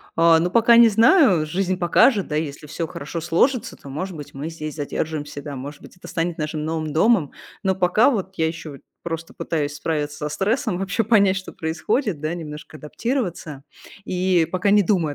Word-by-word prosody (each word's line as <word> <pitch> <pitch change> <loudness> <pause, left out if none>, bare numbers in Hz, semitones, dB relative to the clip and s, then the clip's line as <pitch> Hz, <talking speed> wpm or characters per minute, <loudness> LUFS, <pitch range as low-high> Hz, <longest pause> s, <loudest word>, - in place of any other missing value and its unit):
А, 165 0 +5
ну, 175 +2 0
пока 235 +2 +5
не 235 -1 +8
знаю. 225 - +5
Жизнь 185 +3 -1
покажет. 195 +4 +3
Да, 150 - -3
если 150 -1 -4
всё 160 +2 -4
хорошо 160 +3 -6
сложится, 225 - +1
то, 140 - -13
может 175 +6 -5
быть, 145 -2 -9
мы 145 +4 -5
здесь 155 -2 -7
задержимся, 150 0 -4
да. 145 -1 -7
Может 140 +3 -8
быть, - - -15
это - - -12
станет 165 0 -2
нашим 150 0 -3
новым 155 -1 -3
домом. 185 -3 +3 0.3
Но 190 -1 +1
пока 185 +6 +3
вот 195 -7 -2
я 160 - +2
ещё 160 -1 -6
вот 140 - -13 0.2
просто 165 -1 -5
пытаюсь 150 -3 -2
справиться 150 -1 -3
со 150 - -4
стрессом, 205 - -1
вообще 195 +4 -1
понять, 200 -3 +3
что 190 - -7
происходит, 165 - -2
да, 155 +2 -3
немножко 155 -2 -8
адаптироваться 170 - -4 0.4
и 180 -2 +1
пока 185 +2 0
не 205 0 +5
думаю 170 -7 +1
165 Hz, 190 wpm, -22 LUFS, 155-195 Hz, 0.4 s, не